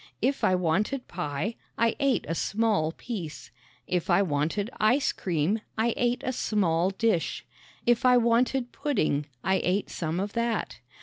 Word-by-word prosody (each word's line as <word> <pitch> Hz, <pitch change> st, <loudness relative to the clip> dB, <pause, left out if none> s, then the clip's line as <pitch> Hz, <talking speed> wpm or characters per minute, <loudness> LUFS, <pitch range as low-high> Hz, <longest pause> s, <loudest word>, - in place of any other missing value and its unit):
If 270 Hz, +4 st, 0 dB
I 185 Hz, -, +4 dB
wanted 190 Hz, +10 st, 0 dB
pie 175 Hz, +5 st, -3 dB, 0.2 s
I 230 Hz, 0 st, +2 dB
ate 275 Hz, -2 st, +2 dB
a -, -, -1 dB
small 200 Hz, -3 st, +1 dB
piece. 175 Hz, -6 st, -7 dB, 0.3 s
If 180 Hz, -2 st, -1 dB
I 200 Hz, -, +5 dB
wanted 165 Hz, -, -1 dB
ice 250 Hz, +6 st, +3 dB
cream 180 Hz, +5 st, -1 dB, 0.2 s
I 225 Hz, +1 st, +2 dB
ate 245 Hz, 0 st, 0 dB
a 255 Hz, -, -1 dB
small 185 Hz, -7 st, +1 dB
dish. 195 Hz, -3 st, 0 dB, 0.4 s
If 240 Hz, 0 st, +3 dB
I 250 Hz, -1 st, +6 dB
wanted 245 Hz, +2 st, +2 dB
pudding 155 Hz, -, 0 dB, 0.2 s
I 190 Hz, 0 st, +2 dB
ate 190 Hz, +3 st, 0 dB
some 165 Hz, +1 st, -2 dB
of 200 Hz, +2 st, -3 dB
that. 235 Hz, -, -1 dB
210 Hz, 150 wpm, -27 LUFS, 170-235 Hz, 0.4 s, I